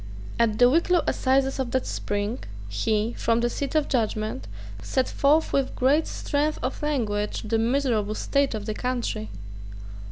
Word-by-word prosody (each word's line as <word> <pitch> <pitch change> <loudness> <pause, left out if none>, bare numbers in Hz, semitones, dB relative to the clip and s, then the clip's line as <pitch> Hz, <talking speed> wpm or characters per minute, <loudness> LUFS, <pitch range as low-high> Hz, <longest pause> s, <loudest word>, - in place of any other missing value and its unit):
At 225 -2 +2
the 245 - +7
Wicklow 335 +5 +3
assizes 270 +1 +1
of 260 -2 -1
that 260 +1 0
spring, 205 +3 -2 0.3
he, 210 - 0
from 230 0 +1
the 240 0 +1
seat 280 +4 -3
of 305 -2 +2
judgment, 215 - -1 0.3
set 260 - 0
forth 300 +3 +2
with 275 -1 0
great 285 +5 +3
strength 300 +1 -1
of 255 - -3
language 220 -9 -1
the 225 +1 0
miserable 230 -4 +1
state 280 -1 +1
of 210 -1 -5
the 215 - -2
country. 240 - -2
245 Hz, 155 wpm, -25 LUFS, 215-275 Hz, 0.3 s, the